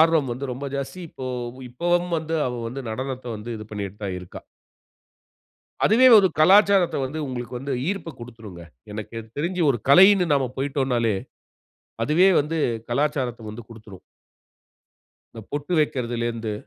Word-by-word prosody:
ஆர்வம் 160 -5 +4
வந்து 130 +2 -5
ரொம்ப 140 +3 -6
ஜாஸ்தி. 140 +6 -5
இப்போ 130 - -7 0.4
இப்பவும் 175 +6 0
வந்து 160 +1 -4
அவ 125 - -2 0.2
வந்து 130 +4 -6
நடனத்த 130 +2 -5
வந்து 105 +3 -8
இது 110 - -8
பண்ணிட்டு 100 -1 -5
தான் 95 -2 -3
இருக்கா. 90 - -10 1.5
அதுவே 245 +5 +6
ஒரு 195 -2 +5
கலாச்சாரத்த 195 +2 +5
வந்து 145 +4 -5
உங்களுக்கு 125 -1 -5
வந்து 135 0 -4
ஈர்ப்ப 185 -5 -3
குடுத்துரும்ங்க. 110 -7 -10 0.3
எனக்கு 110 +2 -7 0.2
தெரிஞ்சு 175 +4 -1
ஒரு 125 - +2
கலைன்னு 185 +4 +7
நம்ம 135 -2 +1
போய்ட்டோம்னாலே, 130 -5 0 0.9
அதுவே 175 +6 +4
வந்து 160 +3 -3 0.3
கலாச்சாரத்த 125 -4 -1
வந்து 110 +2 -8
குடுத்துரும். 110 -4 -13 1.3
இந்த 115 - -9
பொட்டு 145 +5 -3
வைக்கிறதிலேருந்து. 120 -6 -2
135 Hz, 135 wpm, -23 LUFS, 115-160 Hz, 1.5 s, கலைன்னு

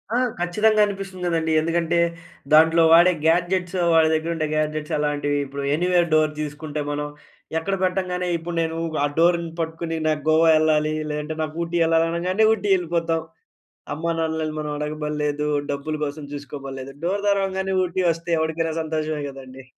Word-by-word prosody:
ఆ! - - +3 0.2
ఖచ్చితంగా 210 +5 +2
అనిపిస్తుంది 195 -2 -6
కదండీ. 165 -2 0
ఎందుకంటే 165 +1 0 0.5
దాంట్లో 160 +2 +6
వాడే 175 +2 +7
గ్యాడ్జెట్స్, 180 +2 +1 0.2
వాడి 160 -1 +5
దగ్గర 160 +1 -1
ఉండే 155 -1 -1
గ్యాడ్జెట్స్ 155 0 -2
అలాంటివి, 145 -1 0
ఇప్పుడు 140 +1 -6
ఎనీవేర్ 175 +1 +2
డోర్ 155 -1 +4
తీసుకుంటే 150 0 -5
మనం. 145 0 -2 0.5
ఎక్కడ 195 +5 -1
పెట్టంగానే 180 -1 -1
ఇప్పుడు 170 +1 -6
నేను 160 0 -2 0.3
ఆ - - +4
డోర్‌ని 170 0 +3
పట్టుకుని 165 0 -3
నాకు 155 -1 0
గోవా 160 +1 +5
వెళ్ళాలి, 155 -1 +2 0.2
లేదంటే 150 +1 -3
నాకు 155 0 -4
ఊటీ 170 +1 -2
వెళ్ళాలి 165 0 +3
అనగానే, 180 +5 0
ఊటీ 210 -1 -3
వెళ్ళిపోతాం. 165 -2 -1 0.7
అమ్మా-నాన్నని 160 0 -2
మనం 150 -1 -3
అడగబడలేదు, 150 0 -2 0.2
డబ్బుల 145 +2 -3
కోసం 145 +1 -6
చూసుకోబడలేదు, 135 -1 -7
డోర్ 200 +3 -1
తెరవంగానే 190 -1 0
ఊటీ 180 +1 -2
వస్తే 165 +1 -7
ఎవడికైనా 160 0 -1
సంతోషమే 155 -1 -2
కదండీ. 135 -1 -11
160 Hz, 145 wpm, -23 LUFS, 150-175 Hz, 0.7 s, వాడే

